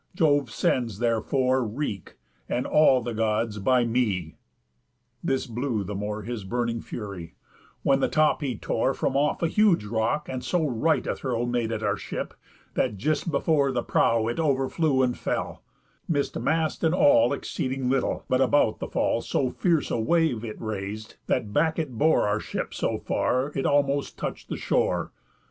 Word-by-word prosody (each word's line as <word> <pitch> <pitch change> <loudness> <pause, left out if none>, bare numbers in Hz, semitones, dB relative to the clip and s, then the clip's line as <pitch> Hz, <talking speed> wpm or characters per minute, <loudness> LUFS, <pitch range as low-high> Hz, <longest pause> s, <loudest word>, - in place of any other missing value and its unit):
Jove 145 -6 +3
sends 115 -2 0
therefore 125 +3 +1
wreak, 110 - -4 0.3
And 125 - -1
all 135 -5 +4
the 120 0 -3
Gods, 110 0 0
by 125 +4 +3
me.' 105 -9 0 0.9
This 135 -1 0
blew 120 -2 -2
the 100 +2 -5
more 105 +1 -4
His 115 -1 -5
burning 115 +2 -2
fury; 100 -7 -7 0.5
when 135 -1 +3
the - - +2
top 155 0 +2
he 130 -6 -2
tore 130 +6 0
From - - -1
off 145 +4 +1
a - - +4
huge 195 - +3
rock, 110 +7 -1
and 130 -1 -4
so 165 +5 0
right 150 +6 +1
a - - -1
throw 120 -3 -2
Made 120 -2 -1
at 110 -1 -3
our 100 -1 +1
ship, - - -5 0.4
that 105 - 0
just 155 - 0
before 140 -2 +2
the 125 -2 -1
prow 115 -1 +2
It 120 +7 -2
overflew 140 -1 +1
and 125 -1 +1
fell, - - -3 0.5
miss'd 145 -4 -1
mast 160 +1 0
and 160 +1 +3
all 285 +6 +5
Exceeding 130 0 -2
little; 130 0 0
but 130 +1 +2
about 130 -4 +3
the - - -4
fall - - 0
So 130 -2 -1
fierce 165 -2 +1
a - - 0
wave 140 -1 +1
it 110 -2 -6
rais'd, 110 0 -5
that 105 -1 -1
back 160 +1 +2
it 155 -5 -2
bore 145 +1 +3
Our 105 +1 +1
ship - - -4
so - - -1
far, 130 +3 0
it 135 - 0
almost 140 -1 +1
touch'd - - -5
the - - -3
shore. - - 0
125 Hz, 175 wpm, -26 LUFS, 110-145 Hz, 0.9 s, all